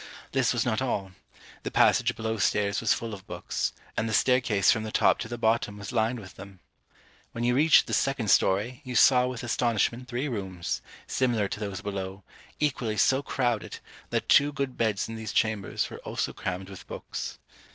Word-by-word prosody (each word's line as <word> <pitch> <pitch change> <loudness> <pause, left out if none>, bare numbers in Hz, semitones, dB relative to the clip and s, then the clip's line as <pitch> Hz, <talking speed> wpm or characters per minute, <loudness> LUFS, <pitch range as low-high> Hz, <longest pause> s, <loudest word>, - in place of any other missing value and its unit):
This - - +2
was - - 0
not - - 0
all; 95 -2 -2 0.5
the - - -4
passage - - +3
below 110 0 -2
stairs 100 0 +1
was 115 - +2
full 115 -2 -1
of 95 -1 -10
books, - - -2 0.2
and 115 - -1
the - - -2
staircase 125 -7 +3
from 110 - +1
the 110 0 -5
top - - +3
to 120 - -4
the 120 +1 -5
bottom 110 -2 +1
was 100 +2 -7
lined 115 0 +1
with 100 -1 -12
them. 95 0 -11 0.7
When 115 - -3
you 120 +1 +3
reached 150 +5 +5
the - - -5
second 135 -6 +1
story, 110 +8 +2
you 125 -2 -6
saw 125 +1 +6
with 125 -2 -5
astonishment 120 0 0
three 125 +4 -2
rooms, 95 -8 -3 0.2
similar 120 -6 +1
to - - -4
those 100 -3 -4
below, 100 -1 -5 0.4
equally 125 -7 -1
so 135 +5 +3
crowded, 120 -6 -1 0.3
that - - -1
two 145 +1 +5
good 140 -3 -3
beds 110 -3 0
in 115 - -6
these 110 -2 -5
chambers 110 -3 0
were - - -8
also - - -3
crammed 90 +1 -4
with 95 -2 -11
books. - - -6
110 Hz, 190 wpm, -27 LUFS, 100-125 Hz, 0.7 s, saw